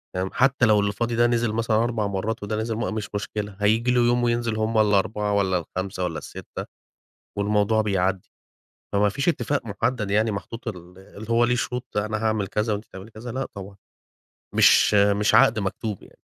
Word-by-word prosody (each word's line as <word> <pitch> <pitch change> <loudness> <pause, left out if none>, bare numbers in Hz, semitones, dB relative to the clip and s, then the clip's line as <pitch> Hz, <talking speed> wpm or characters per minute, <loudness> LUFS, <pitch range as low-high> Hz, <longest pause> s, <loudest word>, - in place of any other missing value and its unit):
فاهم، 95 +1 -1
حتّى 135 -1 +3
لو 105 -2 +4
اللي 100 0 +1
فاضي 115 +3 -2
ده 120 +1 +4
نِزِل 120 -2 +1
مثلًا 115 -1 +1
4 115 -3 -1
مرّات 100 +3 -3
وده 105 +1 -3
نزل 110 +1 -2
مرّة 115 - -2
مش 105 -2 -4
مشكلة، 105 -1 -4
هييجي 110 +4 +2
له 125 -1 +3
يوم 120 +1 +2
وينزل 120 -2 0
همّ 110 +1 0
ال4، 105 0 +2
والَّا 95 -2 +2
ال5، 95 +2 -4
والَّا 85 -3 -2
ال6 - - -8 0.7
والموضوع 105 +1 +2
بيعدّي، 95 -3 -1 0.6
فما 100 +1 +3
فيش 140 - 0
اتفاق 145 -5 -1
محدّد 110 0 -2
يعني 110 +2 +2
محطوط 115 +4 -7
ال 90 -3 -8
اللي 100 +3 -12
هو 115 +1 +3
ليه 125 +1 +1
شروط 125 -1 -4
أنا 105 +1 -1
هاعمل 110 -2 0
كذا 105 +3 -1
وأنتِ 105 +2 -5
تعملي 95 +4 -12
كذا، 115 +3 -8
لأ 130 +3 -3
طبعًا، 100 0 -9 0.8
مش - - +5
مش 100 +1 +3
عقد 110 0 +5
مكتوب 100 +1 -4
يعني. - - -18
110 Hz, 190 wpm, -24 LUFS, 100-115 Hz, 0.8 s, مش